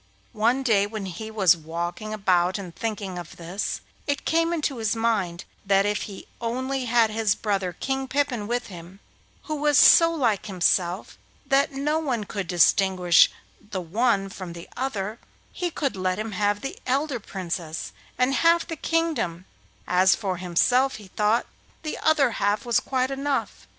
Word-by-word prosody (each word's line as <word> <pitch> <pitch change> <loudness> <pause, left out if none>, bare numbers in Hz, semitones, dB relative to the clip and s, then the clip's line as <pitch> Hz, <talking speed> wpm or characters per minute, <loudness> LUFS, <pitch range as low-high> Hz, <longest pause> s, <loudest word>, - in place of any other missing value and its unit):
One 235 +5 +1
day 205 -5 +3
when 215 -2 -5
he 190 +4 -6
was 195 -6 +4
walking 170 +6 -5
about 185 -3 +2
and 180 -4 -8
thinking 200 -5 -4
of 170 -2 -10
this, 175 +4 -4 0.3
it 285 -1 -1
came 330 +1 +2
into 300 -5 -1
his 220 -1 0
mind 205 -7 -1 0.2
that 195 0 +3
if 205 0 0
he 195 - -9 0.2
only 260 +3 -2
had 230 -2 +3
his 215 -2 +1
brother, 195 -4 -1
King 265 +7 -3
Pippin, 255 -6 -1
with 245 +2 -1
him, 180 +1 -11 0.4
who 310 - -4
was 295 0 +3
so 330 0 +8
like 240 -12 0
himself 180 -1 0 0.3
that 280 +2 +2
no 295 +3 0
one 255 -8 -1
could 200 -2 -5
distinguish 180 0 +4 0.3
the 205 -2 -5
one 195 +3 +1
from 185 -3 -8
the 170 0 -10
other, 220 -4 -3 0.3
he 355 -1 -2
could 280 -6 -2
let 185 -1 -1
him 215 +1 -4
have 205 +1 0
the 275 - -6
elder 270 0 0
Princess 170 -5 -5 0.3
and 250 +2 +2
half 335 +3 +3
the 325 - -5
kingdom; 310 - -1 0.4
as 185 +1 +4
for 190 -4 -3
himself, 245 +10 +2
he 205 -3 -11
thought, 210 +4 +1 0.4
the 310 - -4
other 295 -5 +3
half 205 +1 0
was 235 -2 +3
quite 260 0 -1
enough. 275 +1 -2
215 Hz, 165 wpm, -25 LUFS, 185-265 Hz, 0.4 s, so